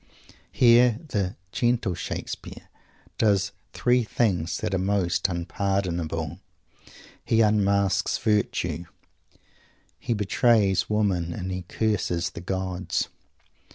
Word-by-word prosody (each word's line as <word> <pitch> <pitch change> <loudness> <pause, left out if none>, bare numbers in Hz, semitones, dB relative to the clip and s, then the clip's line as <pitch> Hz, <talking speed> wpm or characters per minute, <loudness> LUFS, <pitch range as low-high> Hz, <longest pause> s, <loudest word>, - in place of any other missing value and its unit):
Here 120 -1 +5
the 100 -6 -1 0.2
"gentle 120 -5 +1
Shakespeare" - - -6 0.5
does 100 -3 +3
the - - -37 0.2
three 125 0 +3
things 95 -7 0
that 110 -2 -3
are 95 - +1
most 95 -1 +1
unpardonable. 85 -3 -2 0.8
He 115 0 +2
unmasks 100 -3 +2
virtue; 90 -6 0 1.1
he 120 - -1
betrays 105 -1 +2
Woman; 95 -6 0
and 95 +2 -4
he 90 0 -3
curses 95 -6 -1
the - - -8
gods. 95 0 -2
100 Hz, 100 wpm, -25 LUFS, 90-110 Hz, 1.1 s, Here